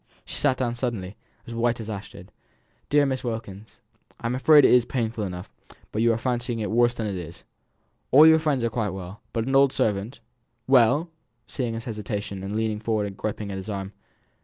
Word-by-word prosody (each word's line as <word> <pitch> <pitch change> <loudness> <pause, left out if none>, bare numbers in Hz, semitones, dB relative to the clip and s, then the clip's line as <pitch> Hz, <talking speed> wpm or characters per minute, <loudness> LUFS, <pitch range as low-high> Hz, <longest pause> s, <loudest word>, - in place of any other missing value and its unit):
She - - -7
sat 135 -3 +2
down 120 -2 -1
suddenly, 115 -6 -4 0.3
as 115 - -8
white 120 0 0
as 110 - -6
ashes. 100 -2 -7 0.6
"Dear 145 0 +4
Miss 130 -1 -2
Wilkins, 110 -3 -6 0.4
I'm 115 +1 -2
afraid 145 +3 +6
it - - +6
is 125 -1 +6
painful 115 -3 -2
enough, 90 -1 -6 0.4
but 110 - -1
you 115 0 +4
are 115 - +1
fancying 120 0 -2
it 105 -2 -3
worse 120 +1 +3
than 115 - -3
it 105 - -2
is. 85 -1 -9 0.7
All 150 +4 +8
your 160 0 +7
friends 150 -6 0
are 115 - 0
quite 110 -2 -1
well; 95 +2 -9
but 115 -1 -1
an 135 +1 0
old 135 -1 +5
servant 110 -1 -1 0.2
" 115 0 -48
"Well!" 125 +5 +5
she - - -12
said, 155 -8 -24
seeing 120 -3 -1
his 115 - -6
hesitation, 105 -3 -4
and 100 +2 -4
leaning 110 -1 -1
forwards 110 -2 -1
and 95 - -12
griping 105 -1 -4
at 95 - -4
his 95 +3 -7
arm. 100 -1 -5
115 Hz, 210 wpm, -25 LUFS, 105-125 Hz, 0.7 s, All